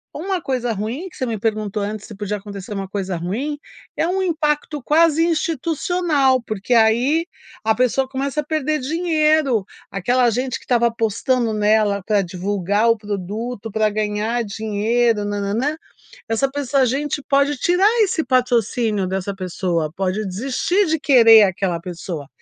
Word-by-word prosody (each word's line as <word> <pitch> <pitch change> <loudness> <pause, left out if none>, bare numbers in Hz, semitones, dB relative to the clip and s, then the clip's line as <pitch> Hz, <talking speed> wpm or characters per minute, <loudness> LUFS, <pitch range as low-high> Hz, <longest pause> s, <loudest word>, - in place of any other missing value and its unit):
uma 370 +3 -2
coisa 250 -5 -2
ruim, 225 - -4
que - - -19
você 260 - -1
me 225 -2 -3
perguntou 215 -1 -2
antes 210 0 -5
se 215 - -10
podia 205 +1 -3
acontecer 200 +1 -8
uma 195 -1 -4
coisa 195 -2 -3
ruim. 230 - -3 0.4
É 325 - 0
o 380 +2 0
impacto 300 -3 -1
quase 325 +2 +3
institucional, 320 -3 +1
porque 215 +2 -2
aí 240 +9 +3 0.4
a 220 0 +2
pessoa 255 +2 +1
começa 275 +2 -2
a - - -10
perder 310 0 -1
dinheiro, 310 - +1 0.3
aquela 245 +6 +2
gente 255 +2 -2
que - - -19
estava 235 -1 +3
apostando 230 +1 0
nela 210 -1 +2
pra 210 -2 +2
divulgar 200 +4 0
o 230 - +3
produto, 210 +3 -5
pra 215 +1 +1
ganhar 215 +3 -1
dinheiro, 220 +1 0
na, 205 0 -2
na, 200 0 -2
nã. 280 +8 -1 0.5
Essa 225 +5 +1
pessoa 275 -1 0
a 255 - +4
gente 285 +3 -2
pode 280 +1 +2
tirar 360 +8 +3
esse 365 -5 +1
patrocínio 235 -5 +1
dessa 190 +1 -3
pessoa, 180 -4 -2
pode 195 +2 -1
desistir 270 - 0
de 320 -1 0
querer 230 -6 +7
aquela 180 -2 -1
pessoa. 170 -4 -6
230 Hz, 160 wpm, -20 LUFS, 205-285 Hz, 0.5 s, querer